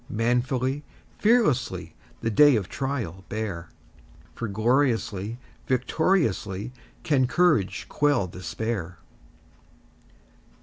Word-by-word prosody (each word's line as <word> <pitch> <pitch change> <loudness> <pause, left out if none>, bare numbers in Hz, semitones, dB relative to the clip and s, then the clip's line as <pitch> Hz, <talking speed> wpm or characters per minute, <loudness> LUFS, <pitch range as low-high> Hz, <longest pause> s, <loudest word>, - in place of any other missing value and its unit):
Manfully, 125 +4 0 0.4
fearlessly, 130 - +2 0.3
The 115 - 0
day 145 +4 +6
of 100 -4 -1
trial 120 -9 -4
bear, 100 -6 -4 0.6
For 115 - -4
gloriously, 115 -1 0 0.3
victoriously, 125 - 0 0.3
Can 140 -7 +2
courage 150 - +2
quell 145 -8 +2
despair! 90 0 -4
120 Hz, 80 wpm, -26 LUFS, 100-140 Hz, 0.6 s, day